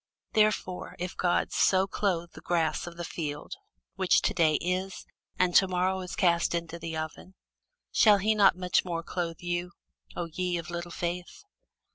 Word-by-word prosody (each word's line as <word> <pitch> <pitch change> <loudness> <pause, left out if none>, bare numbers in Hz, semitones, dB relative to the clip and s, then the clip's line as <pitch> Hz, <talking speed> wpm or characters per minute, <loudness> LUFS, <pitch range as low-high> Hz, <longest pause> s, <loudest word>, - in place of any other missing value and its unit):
Wherefore, 215 -4 +1
if 180 +1 -4
God 175 -1 +1
so 190 0 +3
clothe 180 -4 -1
the - - -12
grass 165 -2 0
of 170 -1 -9
the 175 - -4
field, 150 -3 -5 0.4
which 190 -1 +3
to - - +1
day 160 -5 +3
is, 185 +3 -2 0.3
and 180 -1 +2
to 190 - +5
morrow 185 +1 0
is 180 -1 -6
cast 170 -2 +2
into 170 0 -4
the 165 -1 -5
oven, 160 +4 -6 0.6
shall 210 -2 +6
he 210 +3 +2
not 200 -4 +5
much 180 -1 +1
more 170 -2 -3
clothe 165 -1 -4
you, 175 0 -3 0.4
O 175 - -2
ye 175 +2 -2
of 170 0 -6
little 175 0 -4
faith? 175 - -5
175 Hz, 170 wpm, -28 LUFS, 170-185 Hz, 0.6 s, shall